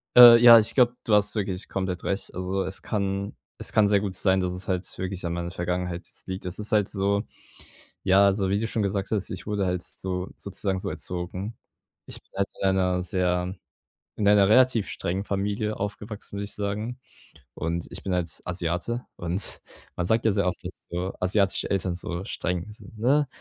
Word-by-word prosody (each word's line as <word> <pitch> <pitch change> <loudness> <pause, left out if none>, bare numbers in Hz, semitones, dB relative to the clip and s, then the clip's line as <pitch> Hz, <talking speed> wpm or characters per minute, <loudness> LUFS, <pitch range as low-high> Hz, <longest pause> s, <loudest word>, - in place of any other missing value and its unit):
Äh, 120 -1 +12
ja, 120 -1 +11
ich 110 - 0
glaube, 125 -2 +4
du 110 - 0
hast 105 0 +3
wirklich 95 -3 -3
komplett 95 -2 -3
recht. 100 - -2
Also 95 +1 -2
es 95 +1 -5
kann 100 -1 -2 0.3
es - - -4
kann 105 -2 +5
sehr 100 -1 +4
gut 100 -2 -3
sein, 95 0 +2
dass 90 -1 -1
es 90 +1 -6
halt 90 0 -1
wirklich 95 -1 -4
an 85 - -1
meiner 85 0 -3
Vergangenheit 90 0 -3
jetzt - - -8
liegt. 95 0 -5
Es 90 +3 -4
ist 105 - -4
halt 105 -2 +3
so, 100 +1 0 0.8
ja, 100 +1 +5
so 100 -1 0
wie 100 +1 +1
du 115 - -1
schon 110 -1 -1
gesagt 100 0 -1
hast, 105 -4 -1
ich - - -6
wurde 105 -2 0
halt 90 -1 -1
so 90 +2 -4
sozusagen 100 -1 -2
so 95 - -3
erzogen. 90 +5 -5 0.5
Ich - - -7
bin - - -38
halt 100 0 +1
in 95 - +3
einer 90 -1 +1
sehr 90 0 0 0.6
in 100 - 0
einer 100 -1 +6
relativ 120 -1 +4
strengen 95 +3 -2
Familie 105 +2 -2
aufgewachsen, 105 +1 -6
würde 100 - -3
ich 100 - -9
sagen. 105 +5 -3 0.6
Und 85 +1 -3
ich - - -6
bin 95 - -3
halt 90 -3 -2
Asiate 90 +7 -2
und 90 +3 -2 0.3
man 90 - -2
sagt 110 +1 +2
ja 110 - +4
sehr 100 -1 +1
oft, 90 - -4
dass - - -8
so 90 +2 -3
asiatische 95 +1 +1
Eltern 95 -2 0
so 90 +1 -5
streng 90 0 -3
sind, 105 0 -14
ne? 140 +6 +3
95 Hz, 200 wpm, -26 LUFS, 90-105 Hz, 0.8 s, Äh